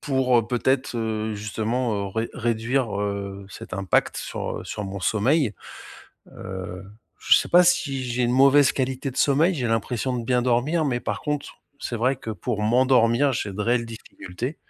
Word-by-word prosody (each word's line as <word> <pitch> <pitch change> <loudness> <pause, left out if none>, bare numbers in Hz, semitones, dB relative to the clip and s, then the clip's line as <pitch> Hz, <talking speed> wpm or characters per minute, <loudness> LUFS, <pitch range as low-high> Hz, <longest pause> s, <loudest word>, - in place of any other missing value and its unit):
pour 130 -5 +2
peut-être, 130 0 0
heu, 110 -1 -2
justement, 110 0 -2
ré 110 +3 -3
réduire, 115 -1 -1
heu, 100 -1 -4
cet 95 - -8
impact 95 -1 +1
sur, - - -4
heu, - - -9
sur 105 - -5
mon 100 0 -6
sommeil. 115 - +2 0.8
Heu, 95 -1 -7 0.3
je - - +4
sais - - +2
pas 180 +1 +6
si 140 -6 +1
j'ai 125 0 -1
une 120 - +1
mauvaise 135 +2 +5
qualité 130 +1 -2
de 125 - -14
sommeil, 155 +6 +3
j'ai 130 -6 -2
l'impression 115 +3 -1
de 120 - -4
bien 125 +1 +2
dormir 130 +7 +1
mais 120 -3 -1
par 120 - -3
contre, 150 -1 -4 0.2
c'est 120 - -3
vrai 130 +4 +1
que 115 - -7
pour 105 +2 -3
m'endormir, 125 +3 +3
j'ai 105 -4 -3
de 105 - -6
réelles 120 +2 +1
difficultés. 115 - -7
120 Hz, 170 wpm, -24 LUFS, 105-130 Hz, 0.8 s, pas